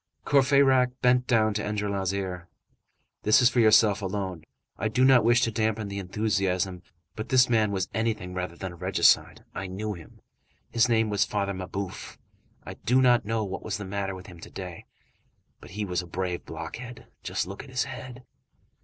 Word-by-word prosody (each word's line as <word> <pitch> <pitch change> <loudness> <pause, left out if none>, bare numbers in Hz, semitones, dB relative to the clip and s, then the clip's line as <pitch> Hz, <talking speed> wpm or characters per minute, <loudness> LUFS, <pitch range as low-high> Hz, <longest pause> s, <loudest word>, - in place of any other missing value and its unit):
Courfeyrac 135 -2 +4
bent 125 0 +3
down 110 -3 +3
to 105 - -2
Enjolras' 100 -3 -1
ear:— 90 -3 -4 0.7
"This 105 - +5
is 125 -1 +5
for 125 - +1
yourself 110 -2 +5
alone, 95 -4 -4 0.3
I 110 - -2
do 125 +4 +2
not 130 -2 +6
wish 120 +1 +4
to 115 - +1
dampen 110 -1 -1
the 100 0 -4
enthusiasm. 95 -2 -1 0.3
But 110 - -6
this 130 -1 +5
man 110 -3 +2
was 95 -2 -1
anything 110 -4 -2
rather 90 -1 -4
than 95 +1 -6
a - - -11
regicide. 90 +3 +2
I 95 - -5
knew 105 +3 -4
him. 85 -4 -13 0.5
His 120 +1 +3
name 110 -2 +2
was 100 -1 +3
Father 100 -1 -2
Mabeuf. 95 +1 -6 0.5
I - - -7
do 125 +3 +1
not 125 -4 +4
know 110 +1 -1
what 95 -1 -5
was 100 -4 -3
the 105 - -6
matter 95 0 -3
with 95 +1 -10
him 90 -5 -12
to - - -11
day. 90 -3 -8 0.7
But - - -13
he 105 +2 -4
was 90 -2 -1
a 90 - -11
brave 90 0 -3
blockhead. 115 +10 -8 0.2
Just - - -2
look 100 +5 -8
at 140 - -14
his 130 -1 0
head." 125 -1 -9
105 Hz, 190 wpm, -27 LUFS, 95-120 Hz, 0.7 s, not